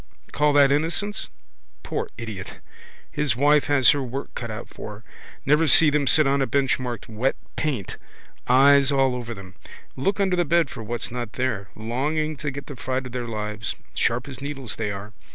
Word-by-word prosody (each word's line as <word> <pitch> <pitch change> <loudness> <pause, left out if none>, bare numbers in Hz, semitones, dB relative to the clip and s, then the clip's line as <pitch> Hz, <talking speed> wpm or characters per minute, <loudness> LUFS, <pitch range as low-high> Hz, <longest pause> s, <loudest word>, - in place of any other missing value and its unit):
Call 150 +1 +2
that 140 -1 +6
innocence? 165 +8 0 0.5
Poor - - -3
idiot! 110 -5 -7 0.5
His 145 -5 0
wife 145 +3 +4
has 140 -3 +6
her 145 - 0
work 135 +2 -5
cut 115 - -5
out 110 +2 -6
for 105 - -8
her. 105 - -15 0.4
Never 150 +3 +4
see 150 +3 +7
them 145 -1 +1
sit 155 +2 +5
on 140 0 +2
a 135 - +1
bench 135 -1 +1
marked 125 -2 -5
Wet 115 +4 0 0.2
Paint. 135 -12 -2 0.5
Eyes 140 +2 +6
all 135 -2 +3
over 120 -2 -5
them. 95 -2 -11 0.4
Look 195 +10 0
under 190 -2 +2
the 175 - +2
bed 170 -2 +2
for - - -7
what's 115 +2 -3
not 120 -2 -5
there. 115 -7 -2
Longing 150 +8 -1
to 150 +1 -3
get 140 +1 -7
the 145 - -8
fright 130 +1 -3
of 125 - -7
their 120 -1 -4
lives. 105 -1 -4 0.2
Sharp 120 +3 0
as 135 -1 -8
needles 135 -6 -5
they 110 -2 -2
are. 100 +2 -6
130 Hz, 190 wpm, -24 LUFS, 115-145 Hz, 0.5 s, see